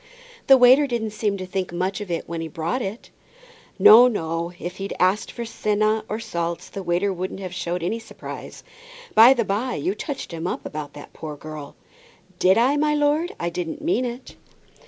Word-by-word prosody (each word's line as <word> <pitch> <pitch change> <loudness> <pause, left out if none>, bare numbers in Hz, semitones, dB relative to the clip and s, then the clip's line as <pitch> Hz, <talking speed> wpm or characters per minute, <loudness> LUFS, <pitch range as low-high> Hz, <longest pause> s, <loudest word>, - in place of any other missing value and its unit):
"The 270 - +8
waiter 260 +3 +6
didn't 230 -4 -2
seem 210 -1 -1
to 185 - -5
think 185 -1 -3
much 185 +4 -2
of 205 - -7
it 170 -1 -3
when 170 0 -4
he 165 - -4
brought 170 +8 -3
it." 210 +2 -6 0.7
"No, 240 +3 +9
no. 170 -6 -2
If 175 +1 -6
he'd 195 0 -5
asked 185 +3 +2
for 235 - -6
senna 215 0 0
and 220 +2 -3
salts, 170 -3 -4
the 195 - -6
waiter 180 +2 0
wouldn't 185 +1 -5
have 185 -2 -6
showed 175 -1 -3
any 220 +7 -1
surprise. 225 - -9 0.5
By 240 +4 +8
the 235 -3 0
by, 225 +6 -1
you 365 +4 -1
touched 285 - -6
him 165 +1 -4
up - - -4
about 150 -1 -6
that 145 - -12
poor 155 -2 -7
girl." 155 -1 -9 0.6
"Did 190 +3 +4
I, 260 +5 +3
my 300 0 +2
lord? 295 +4 +1
I 170 0 -2
didn't 175 - -5
mean 320 -5 +1
it." 245 +1 -7
195 Hz, 195 wpm, -23 LUFS, 175-240 Hz, 0.7 s, No